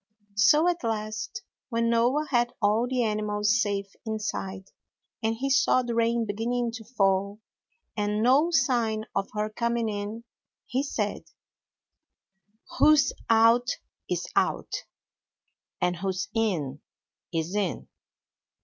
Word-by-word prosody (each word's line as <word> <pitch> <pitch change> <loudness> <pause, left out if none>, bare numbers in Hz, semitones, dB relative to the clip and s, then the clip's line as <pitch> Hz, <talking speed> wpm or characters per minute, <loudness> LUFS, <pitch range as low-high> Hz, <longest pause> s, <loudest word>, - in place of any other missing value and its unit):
So 295 +10 +5
at 350 -3 0
last, 215 - -3 0.3
when 230 -1 +1
Noah 245 +6 +2
had 240 -1 +2
all 220 +2 +2
the 255 -2 +1
animals 210 -1 +1
safe 200 -1 -2
inside, 195 -3 -4 0.5
and 225 0 0
he 270 +4 -2
saw 270 -2 +4
the 240 -1 -3
rain 230 0 +1
beginning 230 +3 -1
to 225 -1 -8
fall, 200 -2 0 0.6
and 210 0 0
no 275 +7 +5
sign 235 -9 +1
of 195 - -1
her 210 0 0
coming 235 +1 -1
in, 210 +2 -4 0.4
he 260 - -1
said: 215 -7 -3 1.5
'Who's 305 -1 +5 0.2
out 230 +2 +5 0.4
is - - -1
out, - - 0 1.1
and 180 0 0
who's 190 +2 -2
in 170 - -1 0.5
is 165 +1 -2
in!' 200 -5 -1
225 Hz, 120 wpm, -27 LUFS, 205-240 Hz, 1.5 s, So